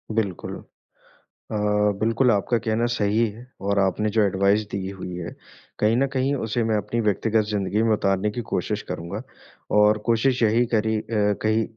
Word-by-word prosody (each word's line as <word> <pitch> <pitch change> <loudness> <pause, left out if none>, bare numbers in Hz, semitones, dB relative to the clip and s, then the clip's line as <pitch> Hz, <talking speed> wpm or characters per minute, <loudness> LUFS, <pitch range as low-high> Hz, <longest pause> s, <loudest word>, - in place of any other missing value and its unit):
बिल्कुल। 100 -6 -2
अ, - - -19 1.1
बिल्कुल 115 +3 +3
आपका 105 +3 +1
कहना 110 +1 +1
सही 110 +1 +2
है 115 +4 -12 0.2
और 100 +1 +1
आपने 100 +2 +1
जो - - +6
एडवाइस 100 +2 +2
दी 95 -1 -3
हुई 95 -2 -7
है, 85 -1 -6 0.4
कहीं 110 +2 +3
न 135 +2 +2
कहीं 135 +1 +1
उसे 115 -2 -1
मैं 110 -1 +1
अपनी 110 +3 -2
व्यक्तिगत 110 +1 +1
ज़िंदगी 105 +1 0
में 115 - +2
उतारने 100 0 +1
की 120 - -4
कोशिश - - -1
करूँगा 85 +6 -5 0.6
और 105 +1 +5
कोशिश 120 +3 +2
यही 115 +2 +3
करी 110 0 +2
अ, - - -8
कही 110 +1 +1
110 Hz, 170 wpm, -24 LUFS, 100-115 Hz, 1.1 s, जो